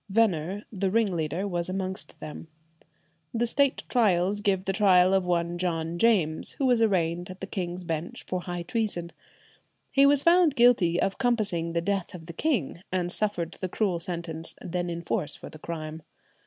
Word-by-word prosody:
Venner, 195 -2 +1
the 195 -1 0
ringleader, 185 -4 0
was 175 -2 -1
amongst 190 0 -4
them. 155 +1 -8 0.9
The 235 +1 +2
State 275 +3 +1
Trials 205 -4 +2
give 195 -2 +1
the 195 - 0
trial 185 -2 +5
of 190 -2 +2
one 175 0 0
John 170 -1 -2
James, 180 -9 +2
who 275 - -1
was 245 -3 +3
arraigned 175 -5 +1
at 185 0 -9
the - - -4
King's 180 -2 -4
Bench 165 -1 -4
for 185 -1 -3
high 175 -1 -4
treason. 205 -7 -2 0.8
He 275 0 +6
was 280 -1 +4
found 340 -3 +5
guilty 230 -9 +4
of 195 - 0
compassing 210 -10 0
the 170 - +1
death 195 0 -2
of 165 -2 -10
the 170 - -8
king, 195 - -1
and 180 -1 0
suffered 180 -5 -1
the 185 - -2
cruel 185 -3 0
sentence 165 -2 -2
then 175 0 -3
in 170 0 -4
force 150 - -2
for - - -10
the 155 - -11
crime. 160 -1 -6
185 Hz, 175 wpm, -27 LUFS, 170-210 Hz, 0.9 s, He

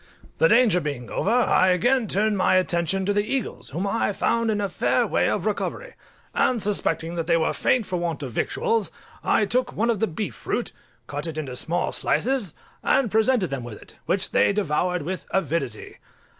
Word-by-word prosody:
The - - +5
danger 215 -8 +4
being 140 -6 -5
over, - - -1
I 235 -5 +4
again 230 +7 +2
turned 210 +3 +1
my 190 -1 +3
attention 185 +1 +1
to 205 - +1
the 205 0 +2
eagles, 255 +1 -3
whom 170 +8 -3
I 205 0 0
found 230 +3 +1
in 210 -1 0
a 200 - 0
fair 190 - +1
way - - +1
of - - -1
recovery, - - -3 0.4
and 250 -2 +2
suspecting 170 -5 -1
that 165 -2 -3
they 170 -1 +4
were 160 - +1
faint 245 -4 +1
for 185 - -2
want 165 -4 -3
of 130 - -5
victuals, 220 - 0 0.3
I 210 - +3
took 245 +4 0
one 230 +2 +1
of 220 - -2
the 225 - +1
beef 185 +5 -4
fruit, - - -3 0.3
cut 145 +3 -4
it 160 -1 -5
into 135 -5 -4
small 170 +7 -1
slices, 250 - 0 0.3
and 245 -7 +2
presented 220 - +2
them 135 -3 -3
with 120 -3 -8
it, - - -16
which 195 0 0
they - - +4
devoured 180 -3 0
with 185 +4 -5
avidity. 195 - -2
195 Hz, 195 wpm, -24 LUFS, 170-225 Hz, 0.4 s, The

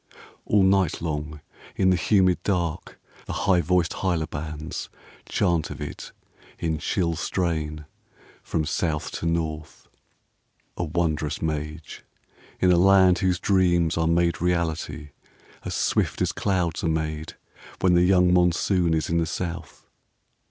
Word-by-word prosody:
All 105 -2 +4
night 95 -3 +2
long 75 -2 -4 0.3
in 95 -1 +3
the - - +4
humid 90 0 +2
dark 85 -4 -2 0.3
the - - -4
high 90 -3 +4
voiced 90 0 +1
hyla 85 -4 -1
bands 75 0 -6 0.4
Chant 85 -3 +1
of - - -8
it - - -7 0.5
in 80 -2 -2
chill 85 0 -1
strain 75 -4 -2 0.6
from 80 - -2
South 80 -1 -2
to 85 - -3
North. 80 -2 -3
VIII - - -43 0.2
A - - -1
wondrous 80 -2 -1
mage, 75 0 -5 0.6
in 90 - +4
a 90 - +4
land 95 -1 +5
whose 90 -2 +1
dreams 85 -4 +2
are 80 -1 +1
made 85 0 +1
reality 85 -4 -1 0.5
As - - -4
swift - - 0
as - - 0
clouds 90 -4 -1
are - - +1
made 80 0 -3 0.5
when 90 -1 +4
the 85 - +5
young 90 -1 +4
Monsoon 90 -1 +2
is 80 - -1
in 85 0 +1
the 80 - 0
South. 85 +1 -6
85 Hz, 140 wpm, -25 LUFS, 80-90 Hz, 0.6 s, land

